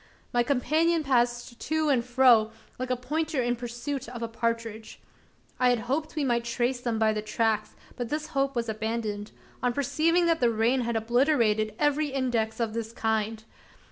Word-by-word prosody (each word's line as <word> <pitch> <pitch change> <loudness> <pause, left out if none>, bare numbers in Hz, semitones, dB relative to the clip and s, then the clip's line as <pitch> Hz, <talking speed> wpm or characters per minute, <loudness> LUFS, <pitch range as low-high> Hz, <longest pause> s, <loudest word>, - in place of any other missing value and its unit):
My 240 - +4
companion 310 +6 +2
passed 240 -2 0
to 315 -1 0
and 255 -4 +3
fro, 240 -3 +4 0.3
like 255 0 -3
a 255 - +2
pointer 300 +4 -2
in 240 0 +1
pursuit 240 +2 -5
of 240 -1 -6
a - - -1
partridge. 230 -1 -3 0.6
I 250 0 +4
had 245 -2 +2
hoped 285 +7 -2
we 300 - 0
might 240 -3 +1
trace 240 +2 -1
them 235 -2 -1
by 220 0 +3
the 215 - -2
tracks; 215 0 -1 0.2
but 245 -2 -4
this 305 +1 -3
hope 275 -3 0
was 235 -1 -1
abandoned, 220 -1 -3 0.3
on 245 -1 +1
perceiving 320 +6 +2
that 330 -1 +2
the 240 - +4
rain 230 +3 +2
had 235 -1 -2
obliterated 225 -2 +2
every 295 0 +2
index 245 -5 -1
of 225 -2 -1
this 225 -1 -4
kind. 220 -1 -1
240 Hz, 175 wpm, -27 LUFS, 225-275 Hz, 0.6 s, My